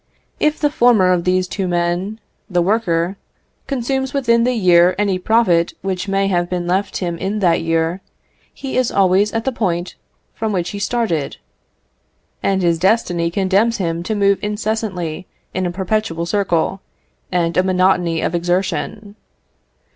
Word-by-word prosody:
If 305 0 +1
the 295 -1 +1
former 235 -10 +4
of 175 -1 -1
these 185 0 +1
two 190 0 -3
men, 175 +4 -1 0.3
the 175 -2 +1
worker, 185 -3 0 0.5
consumes 265 0 -2
within 235 -4 +3
the 250 0 +1
year 180 -3 +4
any 200 -2 0
profit 180 -5 +2
which 190 0 -2
may 195 0 +1
have 175 -2 0
been 180 -1 -2
left 190 +3 -1
him 170 -3 -3
in 195 +3 -2
that 170 -3 +3
year, 165 +2 0 0.5
he 270 -2 -5
is 255 -2 +1
always 195 +2 +3
at 225 0 -2
the 265 - +1
point 180 -7 -2 0.4
from 220 -1 -2
which 180 -1 -1
he 205 - -6
started, 200 - -1 1.0
and 190 -1 +1
his 170 -1 +2
destiny 180 -3 +1
condemns 195 +6 +1
him 170 -4 -2
to 215 +5 -3
move 200 -1 +2
incessantly 210 -5 -3 0.3
in 185 0 -1
a - - -3
perpetual 185 -2 -2
circle, 190 -1 0 0.5
and 170 -2 0
a - - +4
monotony 180 -3 +2
of - - -1
exertion. 190 +4 -2
190 Hz, 155 wpm, -18 LUFS, 175-215 Hz, 1.0 s, former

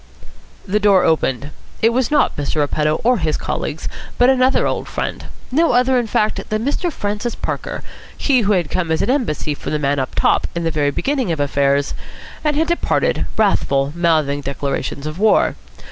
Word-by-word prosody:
The 205 +3 +1
door 200 -2 +4
opened. 145 -3 0 0.3
It 225 - +6
was 255 0 +1
not 300 - +2
Mr. 145 +1 -3
Repetto 150 +1 +1
or 245 -1 +3
his 155 -3 0
colleagues, 155 - -4 0.3
but 245 +2 +5
another 260 0 +3
old - - -2
friend. - - -4 0.3
No 320 +2 +3
other, 250 +1 +3
in 240 - -2
fact, 215 0 0
than 215 +2 -1
Mr. 335 +5 -1
Francis 210 -1 -3
Parker, - - -4 0.3
he 265 -4 +2
who 210 -1 +2
had 175 -6 0
come 180 -3 -1
as 160 - +1
an - - +1
embassy 220 - -1
from 145 - -6
the - - +2
man 145 -1 0
up 130 - -3
top - - +2
in 170 - -2
the 165 - 0
very 150 -2 +1
beginning 260 - -1
of 160 - -2
affairs, 140 0 +1 0.5
and 300 -1 +1
had 320 +2 +2
departed, 345 0 0
wrathful, 140 -9 +1
mouthing 155 -5 +1
declarations 140 0 -3
of 155 +3 -5
war. 215 +1 +3
180 Hz, 185 wpm, -19 LUFS, 145-245 Hz, 0.5 s, It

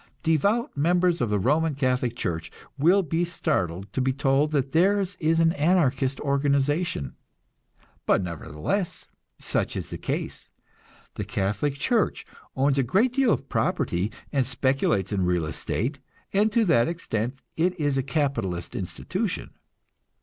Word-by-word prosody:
Devout 200 - +1
members 175 +3 +2
of 120 - +1
the 105 - +2
Roman 150 +8 +1
Catholic 125 -3 0
Church 80 -8 -3 0.2
will 175 +8 +4
be 165 +2 0
startled 95 - -2
to 130 - 0
be 130 +1 +2
told 135 +2 +2
that 140 -3 0
theirs 195 +3 +2
is 165 0 +2
an 165 0 +4
Anarchist 145 -5 +2
organization; 140 - 0 0.9
but 95 - +3
nevertheless, 85 - -3 0.3
such - - -2
is - - -6
the - - -5
case. - - -4 0.7
The - - -2
Catholic 105 +9 -1
Church 220 - 0 0.3
owns 135 +1 +2
a - - +5
great 205 - +2
deal 265 -3 +3
of - - -1
property, 90 +5 0 0.2
and 135 -2 +3
speculates 130 -7 +1
in 100 -2 0
real 90 -2 +1
estate, 125 - -2 0.3
and 210 +2 +3
to 230 0 +3
that 120 -10 +4
extent 125 -7 -3 0.2
it 180 +2 0
is 145 -2 +1
a 135 - +2
capitalist 125 - -2
institution. - - -3
140 Hz, 140 wpm, -26 LUFS, 115-170 Hz, 0.9 s, a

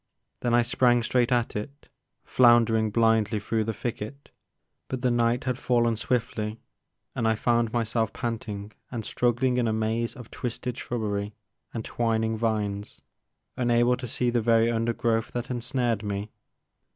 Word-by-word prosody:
Then 120 -1 +1
I 120 - +5
sprang 120 0 +3
straight 125 +1 +2
at 120 -1 +1
it, 140 +8 -6 0.4
flounder 120 -2 +5
ing 110 -1 +2
blindly 110 -1 +2
through 110 +2 -1
the 110 - -1
thicket, 115 +5 -6 0.6
but 130 -1 -4
the 125 - +3
night 120 +1 +2
had 125 -1 -2
fallen 120 -2 +2
swiftly 110 -2 -2 0.5
and 115 - 0
I 110 - +3
found 115 0 +1
myself 115 -1 0
panting 110 -3 -4 0.2
and 115 -3 -5
struggling 125 +1 +1
in 120 -2 +2
a 110 - +1
maze 110 +2 -1
of 125 -4 -11
twisted 125 0 -4
shrubbery 105 -3 -3 0.4
and 115 -2 -5
twining 110 -1 0
vines, 105 -2 -2 0.5
unable 120 0 +3
to 125 -1 -6
see 120 +1 0
the 120 -1 +1
very 115 +1 +3
undergrowth 115 0 0
that 120 +1 -3
ensnared 120 -2 -1
me. 105 0 -4
115 Hz, 150 wpm, -26 LUFS, 110-120 Hz, 0.6 s, I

